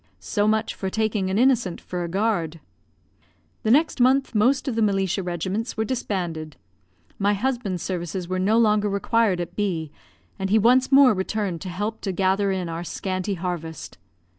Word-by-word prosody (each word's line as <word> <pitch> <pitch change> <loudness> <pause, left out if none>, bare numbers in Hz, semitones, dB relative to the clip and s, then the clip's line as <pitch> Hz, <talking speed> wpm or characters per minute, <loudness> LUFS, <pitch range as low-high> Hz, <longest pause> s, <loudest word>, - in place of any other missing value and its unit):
So 205 0 0
much 220 +1 +1
for 190 - -4
taking 215 -2 -1
an 190 - 0
innocent 240 -7 +2
for 180 -1 -5
a - - -3
guard. 175 -5 -1 1.0
The 220 - -1
next 295 +4 +3
month 265 +2 +3
most 250 +7 +2
of 265 - 0
the 225 - 0
militia 195 -2 +1
regiments 185 +6 -3
were 220 - 0
disbanded. 175 - -3 0.6
My 205 +1 +2
husband's 215 -6 -2
services 175 -1 -4
were 185 +1 -2
no 205 +4 +2
longer 210 -2 +3
required 200 -1 +1
at 175 - -5
B, 170 -7 -2 0.5
and 195 0 -2
he 215 - +4
once 250 +5 +4
more 275 -3 +7
returned 190 -2 -2
to 190 - -5
help 210 +5 -4
to 195 - -2
gather 195 +2 +1
in 185 -2 -2
our 165 +1 -4
scanty 185 +2 -3
harvest. 165 - -5
200 Hz, 170 wpm, -24 LUFS, 180-220 Hz, 1.0 s, more